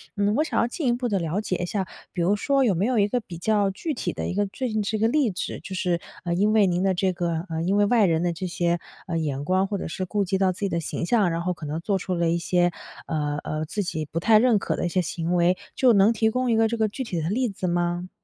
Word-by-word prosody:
嗯， 205 Hz, 0 st, +1 dB
我 305 Hz, -, +3 dB
想 320 Hz, -, -1 dB
要 -, -, +3 dB
进 265 Hz, +2 st, -3 dB
一 240 Hz, -, +3 dB
步 245 Hz, 0 st, -2 dB
地 200 Hz, -4 st, 0 dB
了 170 Hz, +3 st, -1 dB
解 185 Hz, -4 st, -2 dB
一 175 Hz, -, -2 dB
下， 195 Hz, +1 st, -2 dB, 0.3 s
比 175 Hz, -, -3 dB
如 195 Hz, +4 st, +3 dB
说 275 Hz, +6 st, +2 dB
有 220 Hz, -7 st, +3 dB
没 180 Hz, +4 st, 0 dB
有 255 Hz, -, +1 dB
一 205 Hz, -1 st, +4 dB
个 245 Hz, -, 0 dB
比 180 Hz, -7 st, -9 dB
较 205 Hz, +2 st, +2 dB
具 295 Hz, -, -3 dB
体 -, -, -3 dB
的 -, -, -4 dB
一 -, -, -2 dB
个 205 Hz, +1 st, 0 dB
最 255 Hz, +6 st, -4 dB
近 215 Hz, -1 st, 0 dB
是 220 Hz, +1 st, -1 dB
个 220 Hz, +1 st, +2 dB
例子， 235 Hz, -8 st, 0 dB
就 190 Hz, -, -7 dB
是， 180 Hz, -2 st, 0 dB, 0.2 s
呃， 170 Hz, -1 st, -1 dB
因 205 Hz, +4 st, +2 dB
为 210 Hz, -2 st, +5 dB
您 180 Hz, 0 st, +1 dB
的 190 Hz, -1 st, +2 dB
这 185 Hz, +1 st, +1 dB
个 170 Hz, -1 st, -2 dB
呃， 160 Hz, 0 st, -2 dB
因 185 Hz, +4 st, +1 dB
为 205 Hz, -, +4 dB
外 220 Hz, -1 st, +4 dB
人 165 Hz, 0 st, +1 dB
的 175 Hz, -1 st, 0 dB
这 185 Hz, +3 st, -4 dB
些， 175 Hz, -1 st, 0 dB, 0.3 s
呃， 175 Hz, -3 st, -4 dB
眼 145 Hz, -2 st, -2 dB
光， 185 Hz, +2 st, +2 dB
或 200 Hz, -1 st, -2 dB
者 -, -, -4 dB
是 185 Hz, +3 st, -4 dB
顾 205 Hz, +2 st, -1 dB
及 190 Hz, +1 st, 0 dB
到 190 Hz, -1 st, +3 dB
自 180 Hz, -, -9 dB
己 200 Hz, -, 0 dB
的 170 Hz, -, -1 dB
形 165 Hz, +1 st, -3 dB
象， 205 Hz, -4 st, +3 dB
然 165 Hz, 0 st, -2 dB
后 180 Hz, 0 st, 0 dB
可 155 Hz, -3 st, -8 dB
能 155 Hz, +3 st, -3 dB
做 195 Hz, +1 st, 0 dB
出 180 Hz, +1 st, -3 dB
了 170 Hz, -1 st, +1 dB
一 170 Hz, -, +1 dB
些， 175 Hz, 0 st, +2 dB, 0.3 s
呃 150 Hz, -2 st, -2 dB
呃， 155 Hz, 0 st, -3 dB
自 205 Hz, +5 st, -2 dB
己 160 Hz, -3 st, -3 dB
不 165 Hz, -, -1 dB
太 215 Hz, +4 st, +5 dB
认 240 Hz, -3 st, +4 dB
可 -, -, -1 dB
的 -, -, -3 dB
一 175 Hz, -, 0 dB
些 185 Hz, -, 0 dB
行 170 Hz, +1 st, -1 dB
为。 175 Hz, +1 st, +3 dB, 0.2 s
就 250 Hz, -3 st, +5 dB
能 200 Hz, +3 st, +5 dB
提 220 Hz, -1 st, +1 dB
供 255 Hz, 0 st, 0 dB
一 -, -, +3 dB
个 225 Hz, 0 st, +4 dB
这 230 Hz, +1 st, -2 dB
个 220 Hz, -1 st, +2 dB
具 260 Hz, -, -5 dB
体 175 Hz, -9 st, -3 dB
的 160 Hz, -, -2 dB
例 250 Hz, +5 st, +1 dB
子 190 Hz, -3 st, -4 dB
吗？ 175 Hz, +1 st, -1 dB
190 Hz, 330 characters per minute, -25 LUFS, 175-215 Hz, 0.3 s, 为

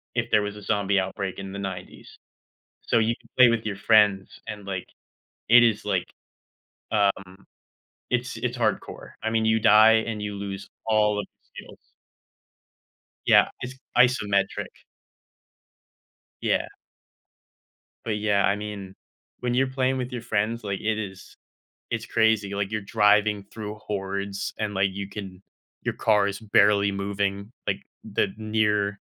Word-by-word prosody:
if -, -, -1 dB
there 105 Hz, -, +5 dB
was 105 Hz, 0 st, -4 dB
a 105 Hz, -, -10 dB
zombie 100 Hz, -2 st, +1 dB
outbreak 95 Hz, 0 st, -4 dB
in 95 Hz, 0 st, -6 dB
the 100 Hz, -, -6 dB
90s. 95 Hz, -2 st, -7 dB, 0.7 s
So, 115 Hz, -, +3 dB
you 115 Hz, +1 st, +1 dB
can 115 Hz, -, -24 dB
play 125 Hz, -1 st, +9 dB
with 115 Hz, -2 st, 0 dB
your 100 Hz, -2 st, -3 dB
friends 105 Hz, -2 st, +4 dB, 0.2 s
and, 105 Hz, -1 st, -7 dB
like, 95 Hz, -2 st, -4 dB, 0.6 s
it 120 Hz, +1 st, +8 dB
is, 110 Hz, -3 st, +2 dB
like, -, -, 0 dB, 0.9 s
um, 100 Hz, -2 st, 0 dB, 0.7 s
it's 125 Hz, +1 st, -1 dB
it's 125 Hz, 0 st, -3 dB
hardcore, 110 Hz, -3 st, -2 dB
I 110 Hz, -, 0 dB
mean, 110 Hz, -1 st, +1 dB
you 110 Hz, 0 st, +3 dB
die 110 Hz, +1 st, +6 dB
and 110 Hz, -2 st, -3 dB
you 105 Hz, -1 st, -4 dB
lose 100 Hz, -1 st, -6 dB, 0.2 s
all 105 Hz, -1 st, +3 dB
of 105 Hz, -, -5 dB, 0.3 s
your -, -, -8 dB
skills. -, -, -18 dB, 1.3 s
Yeah, -, -, +6 dB
it's 125 Hz, +1 st, -6 dB, 0.2 s
isometric. 105 Hz, -6 st, +2 dB, 1.7 s
Yeah. -, -, +1 dB, 1.4 s
But, 110 Hz, -2 st, -2 dB
yeah, 105 Hz, -1 st, +2 dB
I 100 Hz, -, +2 dB
mean, 105 Hz, -2 st, -7 dB, 0.4 s
when 125 Hz, -1 st, -1 dB
you're 135 Hz, +2 st, +2 dB
playing 130 Hz, 0 st, 0 dB
with 125 Hz, 0 st, -4 dB
your 120 Hz, -2 st, -4 dB
friends, 115 Hz, 0 st, -1 dB
like, 100 Hz, -2 st, -3 dB
it 110 Hz, 0 st, -1 dB
is 95 Hz, -2 st, -8 dB, 0.5 s
it's 115 Hz, -1 st, -3 dB
crazy, 110 Hz, -3 st, +2 dB
like, 100 Hz, 0 st, -2 dB
you're 110 Hz, -, -1 dB
driving 105 Hz, 0 st, +3 dB
through 105 Hz, -1 st, -6 dB
hordes, 100 Hz, -1 st, -4 dB
and, 105 Hz, -1 st, -2 dB
like, 95 Hz, +1 st, +2 dB
you 100 Hz, 0 st, -5 dB
can 95 Hz, -2 st, -8 dB, 0.4 s
your -, -, -2 dB
car 105 Hz, -2 st, +3 dB
is 100 Hz, -1 st, -3 dB
barely 100 Hz, -1 st, +4 dB
moving, 100 Hz, +1 st, -2 dB
like, -, -, -1 dB, 0.2 s
the 105 Hz, -1 st, 0 dB
near 105 Hz, -2 st, 0 dB
105 Hz, 150 wpm, -25 LUFS, 100-110 Hz, 1.7 s, play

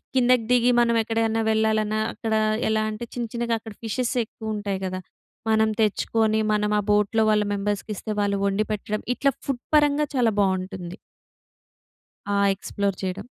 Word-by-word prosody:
కిందకి 250 Hz, -2 st, +4 dB
దిగి 245 Hz, 0 st, +4 dB
మనం 235 Hz, -1 st, +3 dB
ఎక్కడైనా 225 Hz, 0 st, 0 dB
వెళ్ళాలన్నా 215 Hz, -1 st, +1 dB
అక్కడ 225 Hz, -1 st, -3 dB, 0.4 s
ఎలా 220 Hz, 0 st, +2 dB
అంటే 215 Hz, +2 st, -5 dB
చిన్న 240 Hz, -1 st, -3 dB
చిన్నగా 235 Hz, -1 st, -1 dB
అక్కడ 220 Hz, -1 st, -10 dB
ఫిషెస్ 240 Hz, +2 st, -1 dB
ఎక్కువ 220 Hz, 0 st, -6 dB
ఉంటాయి 200 Hz, -2 st, -3 dB
గదా! 185 Hz, 0 st, -3 dB, 0.5 s
మనం 220 Hz, 0 st, +3 dB
తెచ్చుకొని 220 Hz, +1 st, +1 dB
మనం 210 Hz, 0 st, +1 dB
ఆ -, -, +1 dB
బోట్‍లో 210 Hz, +2 st, +3 dB
వాళ్ళ 210 Hz, -1 st, +3 dB
మెంబర్స్‌కిస్తే 205 Hz, +1 st, -3 dB
వాళ్ళు 200 Hz, -1 st, 0 dB
వండి 200 Hz, +2 st, 0 dB
పెట్టడం 215 Hz, 0 st, -3 dB
ఇట్లా 275 Hz, +2 st, +2 dB
ఫుడ్ 255 Hz, -3 st, -3 dB
పరంగా 295 Hz, 0 st, +4 dB
చాలా 240 Hz, -3 st, +3 dB
బాగుంటుంది. 190 Hz, -1 st, -2 dB, 1.3 s
ఆ! 200 Hz, -, +1 dB, 0.2 s
ఎక్స్‌ప్లోర్ 200 Hz, 0 st, -2 dB
చేయడం. 185 Hz, -1 st, -4 dB
220 Hz, 150 wpm, -24 LUFS, 205-230 Hz, 1.3 s, కిందకి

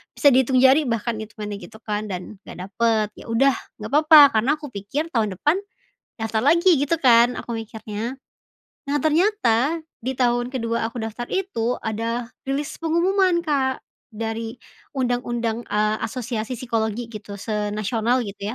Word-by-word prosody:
bisa 290 Hz, -, +3 dB
dihitung 255 Hz, 0 st, +3 dB
jari 270 Hz, +4 st, +6 dB
bahkan 230 Hz, 0 st, -1 dB
itungannya 210 Hz, -2 st, -6 dB
gitu 220 Hz, +5 st, -12 dB
kan, 210 Hz, 0 st, -3 dB
dan 180 Hz, +3 st, -6 dB
nggak 185 Hz, +1 st, -8 dB
dapet. 220 Hz, 0 st, +1 dB
Ya -, -, -12 dB
udah, 270 Hz, +2 st, +4 dB, 0.2 s
nggak -, -, -7 dB
apa-apa, 310 Hz, 0 st, +8 dB, 0.2 s
karena 250 Hz, +7 st, +1 dB
aku 295 Hz, -, -7 dB
pikir 225 Hz, +11 st, -3 dB
tahun 215 Hz, -4 st, +1 dB
depan 320 Hz, +6 st, +2 dB, 0.6 s
daftar 225 Hz, 0 st, 0 dB
lagi 340 Hz, +5 st, +5 dB
gitu 290 Hz, +4 st, +1 dB
kan 240 Hz, -2 st, +5 dB
aku 235 Hz, -, -6 dB
mikirnya. 220 Hz, +2 st, -5 dB, 0.7 s
Nah 285 Hz, -, +1 dB
ternyata, 315 Hz, -, +2 dB, 0.3 s
di 260 Hz, -, -1 dB
tahun 245 Hz, -1 st, +1 dB
ke-2 230 Hz, -2 st, -1 dB
aku 235 Hz, +1 st, -6 dB
daftar 225 Hz, +2 st, -5 dB
itu 250 Hz, -12 st, -1 dB
ada 230 Hz, +2 st, -2 dB, 0.2 s
rilis 280 Hz, +2 st, -2 dB
pengumuman 345 Hz, +2 st, +2 dB
Kak, 270 Hz, -4 st, 0 dB, 0.3 s
dari 225 Hz, +1 st, -4 dB, 0.4 s
undang-undang, 240 Hz, -2 st, -1 dB
eee, 215 Hz, +1 st, +1 dB
asosiasi 235 Hz, 0 st, -4 dB
psikologi 230 Hz, -1 st, -2 dB
gitu, 205 Hz, -1 st, -8 dB
se-Nasional 215 Hz, +3 st, -1 dB
gitu 200 Hz, +1 st, -5 dB
235 Hz, 145 wpm, -23 LUFS, 220-270 Hz, 0.7 s, apa-apa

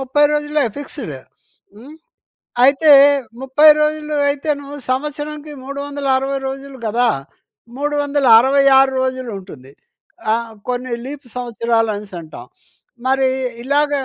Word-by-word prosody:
30 270 Hz, +3 st, +2 dB
రోజులే 295 Hz, 0 st, 0 dB
ఫిక్స్డ్ 265 Hz, -, -7 dB, 0.6 s
హ్మ్. 265 Hz, +8 st, -13 dB, 0.7 s
అయితే, 285 Hz, +3 st, +4 dB, 0.5 s
30 280 Hz, +4 st, +5 dB
రోజులు 300 Hz, 0 st, -1 dB
అయితేను 285 Hz, 0 st, -2 dB, 0.2 s
సంవత్సరానికి 295 Hz, +2 st, -4 dB
360 275 Hz, -1 st, -2 dB
రోజులు 270 Hz, 0 st, -6 dB
కదా! 235 Hz, +3 st, +1 dB, 0.7 s
366 275 Hz, -2 st, +4 dB
రోజులుంటుంది. 200 Hz, -, -5 dB, 0.6 s
ఆహ్, 230 Hz, 0 st, -2 dB, 0.2 s
కొన్ని 250 Hz, 0 st, -3 dB
లీప్ 280 Hz, 0 st, -8 dB
సంవత్సరాలు 230 Hz, -2 st, -1 dB
అనేసంటాం. 180 Hz, -6 st, -9 dB, 0.6 s
మరీ 265 Hz, 0 st, +2 dB, 0.3 s
ఇలాగ 290 Hz, +3 st, +1 dB
270 Hz, 90 wpm, -18 LUFS, 245-290 Hz, 0.7 s, 30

